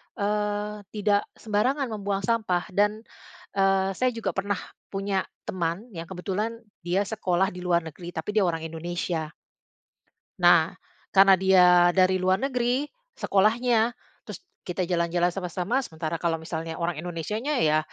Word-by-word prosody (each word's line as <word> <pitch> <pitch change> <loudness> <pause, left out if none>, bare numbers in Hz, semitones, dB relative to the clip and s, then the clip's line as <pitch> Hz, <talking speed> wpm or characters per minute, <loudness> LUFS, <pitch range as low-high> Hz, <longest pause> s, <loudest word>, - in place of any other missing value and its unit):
eee, 210 0 -2
tidak 205 -1 +1
sembarangan 245 +5 0
membuang 200 -1 -2
sampah. 190 -4 +1
Dan 210 +3 +1 0.5
eee, 195 0 +3
saya 255 0 +1
juga 230 - -2
pernah 200 +1 -2 0.3
punya 195 -1 -1 0.2
teman 185 +6 -3
yang 165 - -5
kebetulan 205 +5 -3 0.2
dia 180 +3 +1
sekolah 190 -3 0
di 180 - -9
luar 170 -1 +2
negeri, 170 +2 -9
tapi 160 +6 -3
dia 205 -3 +4
orang 165 -1 -1
Indonesia. 165 -1 -3 1.1
Nah, - - +5 0.4
karena 195 0 +7
dia 190 -1 +5 0.2
dari 185 +1 +3
luar 185 +1 +3
negeri, 255 +1 0 0.3
sekolahnya, 225 +3 +3 0.3
terus - - -8 0.2
kita 180 0 -2
jalan-jalan 175 0 +1
sama-sama, 190 +7 -1
sementara 160 -6 -5
kalau 165 -1 +1
misalnya 160 0 -5
orang 170 0 -1
Indonesianya, 210 - -2
ya 155 -5 +3
190 Hz, 135 wpm, -26 LUFS, 175-210 Hz, 1.1 s, karena